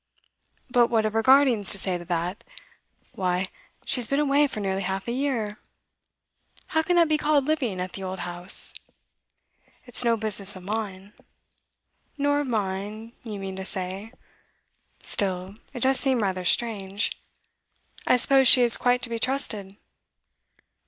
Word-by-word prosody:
'But 240 -1 +4
what 225 -2 +1
have 215 0 -1
her 225 - +2
guardians 255 -5 +4
to - - +4
say 190 -1 -1
to 175 - -10
that? 175 +3 -3 0.7
Why, 185 0 -2 0.4
she - - +1
has 240 -2 +4
been 275 - 0
away 290 0 +3
for 240 - -6
nearly 195 -1 -2
half 190 +2 -3
a - - -1
year. 240 -5 -2 1.1
How 320 - +1
can 355 +2 0
that 340 -1 +5
be 305 0 +1
called 295 -2 +2
living 265 -11 -1
at 180 0 -5
the 195 - -7
old 185 -1 -5
house?' 175 +1 0 1.1
'It's 245 0 +1
no 230 -1 +2
business 205 -2 0
of 185 - -11
mine.' 200 -1 -5 1.0
'Nor 285 0 +1
of 290 - -2
mine, 210 +1 -4
you 215 -4 -6
mean 195 -1 -6
to 190 - -5
say. 190 +3 -5 0.9
Still, 190 -1 -1 0.2
it 245 - -8
does 265 +1 +3
seem 260 -3 +2
rather 185 -2 -2
strange. 205 -2 +1 1.0
I 250 - +5
suppose 270 +1 +4
she 250 +1 +7
is 235 -1 +5
quite 245 0 +1
to 235 - -3
be 230 - -2
trusted? 220 -7 0
220 Hz, 160 wpm, -25 LUFS, 190-255 Hz, 1.1 s, she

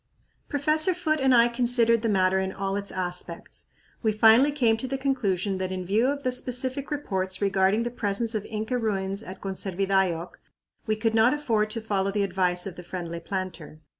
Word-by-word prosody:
Professor 310 +4 +2
Foote 310 -3 0
and 265 -1 +3
I 235 -1 +6
considered 235 -1 +2
the 230 - 0
matter 190 -1 +3
in 190 0 -2
all 195 0 -3
its 200 0 -3
aspects. 180 -2 -6 0.3
We 220 - +2
finally 225 +6 +6
came 240 -6 +2
to 260 - -4
the 270 +1 -2
conclusion 205 -8 -1
that 185 0 -2
in 185 -1 -4
view 215 +7 +2
of 280 +1 -2
the 255 - +1
specific 255 +2 -2
reports 190 -11 -2
regarding 195 +2 +2
the 240 - -3
presence 230 0 -1
of 215 -2 -2
Inca 220 +3 -2
ruins 195 -3 -2
at 190 -3 -9
Conservidayoc 190 -2 -1 0.5
we 215 - +1
could 220 +1 0
not 225 +4 +4
afford 225 -8 0
to 225 +1 -3
follow 200 -3 0
the 200 0 0
advice 180 -2 0
of 185 -4 -7
the 180 - -8
friendly 170 -1 -5
planter. 170 -4 -5
210 Hz, 190 wpm, -26 LUFS, 190-245 Hz, 0.5 s, I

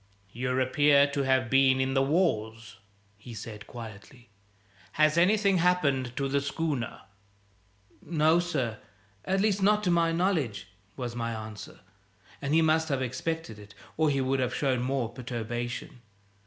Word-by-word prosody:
"You 125 +3 -2
appear 140 +2 +4
to 140 0 -1
have 130 -1 +2
been 135 +1 +4
in 130 0 0
the 135 - +3
wars," 115 - -1 0.4
he 115 +2 -10
said 110 -1 -8
quietly. 120 +2 -11 0.6
"Has 155 0 +3
anything 195 +2 +3
happened 140 -8 +1
to 140 - 0
the 140 +1 0
schooner?" 140 -5 -3 1.0
"No, 160 +1 +2
sir; 135 -11 -2 0.5
at 190 +1 +1
least 205 -2 +1
not 210 +2 +3
to 180 - +2
my 170 -1 +3
knowledge," 155 - -1 0.3
was 120 -2 -5
my 115 -1 -2
answer; 110 -1 -9 0.6
and 140 +2 0
he 165 - +5
must 160 0 +2
have; 135 -2 0
expected 130 -1 -4
it, 100 -1 -14 0.2
or 160 -1 +2
he 140 -1 +1
would 130 +1 0
have 125 -1 -1
shown 130 -4 0
more 130 -1 -1
perturbation. 120 0 -5
135 Hz, 150 wpm, -28 LUFS, 120-160 Hz, 1.0 s, he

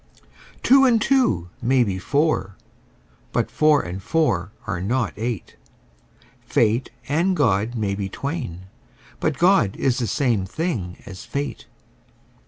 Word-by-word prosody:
Two 270 +1 +6
and 245 -4 +5
two 210 - +1
may 125 +1 +3
be 95 -4 -2
four: 140 - 0 0.8
but - - -1
four 155 -2 +4
and 90 +2 -6
four 95 - 0
are 90 -6 -3
not 115 +3 0
eight: 115 - -4 0.8
Fate 115 +3 +1 0.2
and 170 +6 +1
God 110 -3 +1
may 105 -4 -1
be 100 -1 -3
twain: 135 - -4 0.6
but 155 -3 0
God 175 - +3
is 130 -2 +1
the 120 - -1
same 120 -8 +1
thing 105 - -3
as 95 -5 -9
fate. 140 0 -5
120 Hz, 130 wpm, -22 LUFS, 95-155 Hz, 0.8 s, Two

